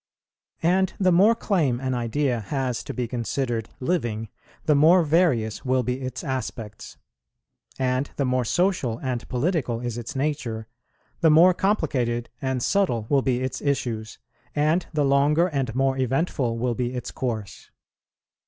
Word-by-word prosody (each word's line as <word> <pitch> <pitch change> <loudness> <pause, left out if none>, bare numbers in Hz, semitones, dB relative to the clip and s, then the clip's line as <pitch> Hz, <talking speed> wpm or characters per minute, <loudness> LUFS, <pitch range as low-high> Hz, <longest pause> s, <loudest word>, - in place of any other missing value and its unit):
And 185 +2 +2
the 185 -2 +4
more 200 +7 +5
claim 160 - 0
an 130 0 -2
idea 120 +1 0
has 125 +2 -2
to - - -4
be 125 -2 -3
considered 120 -1 -2
living, 120 - -1 0.4
the 155 - +4
more 165 +5 +6
various 145 - +1
will 130 -1 +1
be 125 +3 -2
its 130 0 -5
aspects; 115 -5 -5 0.8
and 130 +1 0
the 140 - 0
more 125 0 +1
social 155 - 0
and 125 -2 -3
political 130 -3 0
is 120 -1 -4
its 120 +5 -7
nature, 130 -6 -2 0.5
the 165 - +4
more 170 +4 +7
complicated 130 - 0
and 130 -2 -1
subtle 175 - +1
will 140 -2 +4
be 130 -2 0
its 130 -1 -3
issues, 120 -6 -2 0.4
and 155 +4 +2
the 150 -3 +1
longer 145 +4 +3
and 135 -7 -2
more 135 0 +2
eventful 130 -2 0
will 120 +1 0
be 125 +1 -2
its 125 -1 -5
course. 110 -7 -5
130 Hz, 150 wpm, -24 LUFS, 120-150 Hz, 0.8 s, more